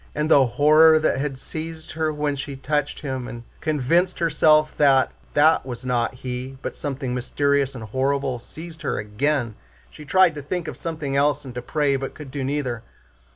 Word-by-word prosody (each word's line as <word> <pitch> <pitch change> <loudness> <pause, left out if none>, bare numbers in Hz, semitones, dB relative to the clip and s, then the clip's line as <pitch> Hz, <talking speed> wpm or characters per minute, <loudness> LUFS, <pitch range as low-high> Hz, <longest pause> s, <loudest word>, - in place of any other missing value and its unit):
And 150 +1 -1
the 135 -4 +6
horror 155 +5 +6
that 155 -4 +1
had 140 -1 -2
seized 160 +3 -7
her 160 -1 -1
when 150 -1 -1
she 140 0 -6
touched 145 +2 -2
him 130 -4 -4
and 120 0 -8 0.2
convinced 165 +4 +1
herself 155 -2 +3
that 135 -3 +4 0.2
that 155 +2 +5
was 125 -1 -7
not 125 0 0
he, 130 +1 -6
but - - -4
something 135 -3 -4
mysterious 140 +2 0
and 115 - -7
horrible, 130 +3 -1
seized 160 +6 -10
her - - -2
again. 115 +4 -1 0.4
She 150 - -12
tried 185 +2 +4
to 150 - -6
think 170 +5 -4
of - - -5
something 155 -4 -4
else 145 0 +2
and 130 - -8
to 125 - -5
pray, 140 +2 0
but 135 0 -6
could 150 -4 -10
do 140 -1 -3
neither. 130 -4 -2
140 Hz, 185 wpm, -23 LUFS, 130-155 Hz, 0.4 s, the